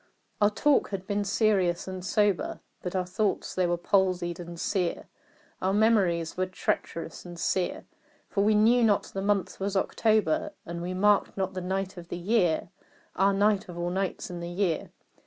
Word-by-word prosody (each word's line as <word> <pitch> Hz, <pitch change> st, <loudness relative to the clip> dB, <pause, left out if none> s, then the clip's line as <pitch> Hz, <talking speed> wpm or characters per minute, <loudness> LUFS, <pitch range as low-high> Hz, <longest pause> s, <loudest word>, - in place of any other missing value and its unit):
Our 205 Hz, -, +6 dB
talk 280 Hz, +7 st, +2 dB
had 195 Hz, -2 st, -4 dB
been 205 Hz, +1 st, -1 dB
serious 195 Hz, -4 st, +1 dB
and 185 Hz, -1 st, -5 dB
sober, 205 Hz, -1 st, +1 dB, 0.2 s
But 180 Hz, +1 st, -4 dB
our 185 Hz, -1 st, 0 dB
thoughts 195 Hz, +3 st, -1 dB
they 185 Hz, -1 st, +1 dB
were 175 Hz, 0 st, +1 dB
palsied 180 Hz, -1 st, +1 dB
and 170 Hz, -1 st, -8 dB
sere 180 Hz, -2 st, -1 dB, 0.6 s
Our 190 Hz, +1 st, +1 dB
memories 195 Hz, -7 st, +2 dB
were 185 Hz, 0 st, 0 dB
treacherous 170 Hz, -2 st, -3 dB
and 175 Hz, -1 st, -9 dB
sere 180 Hz, 0 st, -1 dB, 0.4 s
For 200 Hz, -, 0 dB
we 215 Hz, +1 st, +4 dB
knew 230 Hz, +3 st, +5 dB
not 210 Hz, -3 st, +3 dB
the 195 Hz, -, -6 dB
month 200 Hz, -1 st, 0 dB
was 195 Hz, 0 st, -1 dB
October, 225 Hz, +11 st, +1 dB
And 170 Hz, 0 st, -5 dB
we 180 Hz, +1 st, -3 dB
marked 205 Hz, +2 st, +3 dB
not 190 Hz, 0 st, -1 dB
the 185 Hz, -, -4 dB
night 190 Hz, +1 st, -3 dB
of 170 Hz, -1 st, -9 dB
the 175 Hz, -, -5 dB
year 180 Hz, -3 st, +1 dB, 0.5 s
(Ah, 195 Hz, +1 st, +4 dB
night 200 Hz, -1 st, +2 dB
of 175 Hz, -, -8 dB
all 175 Hz, 0 st, -2 dB
nights 190 Hz, -1 st, -2 dB
in 175 Hz, -, -5 dB
the 170 Hz, 0 st, -5 dB
year!) 175 Hz, -2 st, -1 dB
190 Hz, 180 wpm, -28 LUFS, 175-205 Hz, 0.6 s, Our